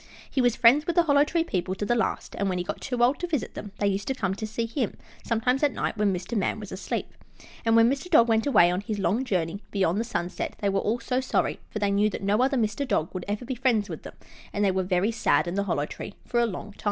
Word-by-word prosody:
He 265 - 0
was 245 -2 +3
friends 255 +7 +5
with 345 - 0
the 345 - +5
Hollow 285 -3 +4
Tree 325 +2 0
people 185 - -2
to 205 - -3
the 240 - +2
last, 235 - -1
and 200 0 +1
when 185 - -1
he 180 - -1
got - - -5
too 250 -3 -1
old 255 +4 +3
to 355 - -2
visit 305 -7 -2
them, 205 - -7
they 205 - -1
used 200 0 0
to 265 - 0
come 190 -6 -1
to 215 +2 -5
see 225 +2 -2
him, 230 -2 -2 0.3
sometimes 245 +3 +1
at 290 -2 +2
night, - - -2
when 210 -2 +2
Mr. 185 +5 -4
Man 205 +1 0
was 210 -2 -8
asleep. 185 - -4 0.5
And 225 0 +3
when 230 0 +6
Mr. 275 +7 -1
Dog 240 -9 +6
went 225 +2 +2
away 190 -10 +5
on 180 +2 -1
his 210 0 -4
long 200 +6 +1
journey 185 -5 -1
beyond 190 -1 +1
the - - +1
sunset 180 -7 -3
they 200 - 0
were 195 0 +1
all 225 +5 0
so 250 +2 -1
sorry, 260 - 0
for - - -5
they 205 -1 +1
knew 205 +1 +3
that 200 - -6
no 205 +4 +2
other 270 +1 +2
Mr. 225 +4 -1
Dog 160 -9 0
would 185 -1 -5
ever 205 +4 -3
be 260 - -3
friends 235 -5 +1
with 160 - -6
them, - - -10 0.4
and 205 0 0
they 195 - +3
were 190 0 0
very 185 +3 +1
sad 220 -5 +2
in 175 - -2
the 200 +1 0
Hollow 145 -6 0
Tree 200 - -8
for 240 - 0
a 235 - +3
long 205 0 -6
time. - - -25
215 Hz, 285 wpm, -26 LUFS, 195-250 Hz, 0.5 s, when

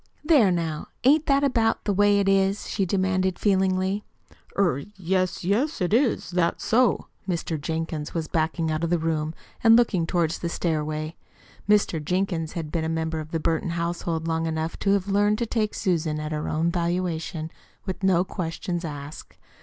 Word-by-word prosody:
There, 295 - +5
now, 165 -3 -2 0.2
ain't 290 +4 +4
that 275 0 +3
about 230 -5 +2
the 205 - 0
way 205 +1 +4
'tis?" 195 +1 +2
she 195 - -1
demanded 185 0 +1
feelingly. 190 0 +1 0.5
"Er 175 -9 +2 0.2
yes, 185 0 0
yes, 235 - 0
it 180 +2 0
is. 240 -5 +2
That's 175 -1 0
so." 245 +2 +3 0.2
Mr. 165 -3 -2
Jenkins 160 -1 -3
was 165 -2 -3
backing 160 0 0
out 155 +1 -2
of 170 - 0
the 175 - +3
room 160 -1 -1 0.3
and 225 0 +8
looking 205 -8 +3
toward 170 -3 +1
the 170 - -3
stairway. 155 -1 -2 0.5
Mr. 200 -7 +3
Jenkins 175 -1 -1
had 165 -4 -5
been 165 -2 -1
a 160 - -1
member 160 0 -1
of 155 0 -7
the 165 - -2
Burton 160 +2 0
household 170 -1 -2
long 165 0 0
enough 160 0 -2
to 200 - 0
have 200 -1 0
learned 205 +1 +2
to 235 - -1
take 215 -2 -1
Susan 160 -4 0
at 155 0 -4
her 150 -1 -2
own 165 +2 +1
valuation, 170 -2 -2 0.3
with 190 -2 -4
no 185 -2 +3
questions 175 -1 -4
asked. 145 -1 -8
175 Hz, 175 wpm, -25 LUFS, 160-195 Hz, 0.5 s, and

